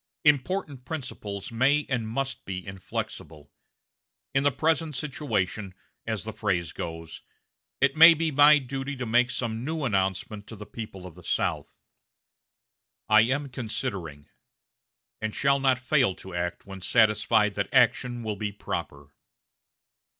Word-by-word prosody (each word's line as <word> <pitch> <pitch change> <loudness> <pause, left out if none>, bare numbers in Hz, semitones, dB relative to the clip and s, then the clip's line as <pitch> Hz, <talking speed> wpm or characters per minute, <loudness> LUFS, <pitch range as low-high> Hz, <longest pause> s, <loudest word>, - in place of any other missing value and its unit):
Important 145 -1 +1
principles 120 -10 -6
may 135 +6 +2
and 120 -5 -1
must 135 +3 -3
be 90 -2 -6
inflexible. 80 -5 -6 0.8
In 135 - +3
the 145 +1 +3
present 160 +2 0
situation, 110 - -2 0.3
as - - -2
the - - -6
phrase 85 -3 -1
goes, 80 -1 -7 0.6
it 135 0 +3
may 165 +1 +10
be 160 0 0
my 145 +2 +7
duty 135 +1 -4
to 125 -1 -4
make 120 +2 +3
some 120 -2 -3
new 160 +2 -3
announcement 100 -1 -1
to 115 - -9
the 105 0 -9
people 105 -5 -8
of 90 - -9
the 90 +2 -15
South. - - -1 1.3
I 110 0 +7
am 135 +5 0
considering, 95 - -5 0.9
and 110 0 -3
shall 140 0 +3
not 135 -2 +3
fail 130 -6 +2
to 95 - -11
act 85 0 -3
when 95 -1 -9
satisfied 110 0 +3
that 100 -1 -3
action 120 -1 +2
will 105 -2 -3
be 105 0 -3
proper." 70 -7 -6
115 Hz, 140 wpm, -27 LUFS, 95-135 Hz, 1.3 s, may